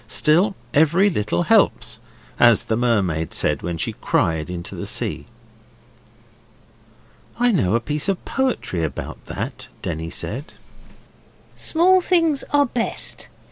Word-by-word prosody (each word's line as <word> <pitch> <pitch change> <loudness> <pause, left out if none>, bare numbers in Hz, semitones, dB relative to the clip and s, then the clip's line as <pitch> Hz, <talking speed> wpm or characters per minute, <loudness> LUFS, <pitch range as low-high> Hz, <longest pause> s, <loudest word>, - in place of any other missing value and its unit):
Still, 180 +6 +3 0.2
every 170 +7 +4
little 105 - -1
helps, - - +2 0.4
as 120 -3 +6
the 110 - -1
mermaid 100 -10 0
said 75 -2 +1
when 85 0 -4
she - - -2
cried 80 0 0
into 85 -1 -5
the - - -5
sea.' - - -1 2.1
'I 245 +1 +3
know 115 - +2
a - - +3
piece 150 +8 -1
of 195 - -2
poetry 255 - -1
about 80 - -5
that,' - - -5 0.2
Denny 80 -1 -4
said. 135 - -5 1.0
'Small 365 +3 +3
things 330 -6 +2
are 290 0 +3
best. 240 -2 -4
130 Hz, 125 wpm, -21 LUFS, -, 2.1 s, as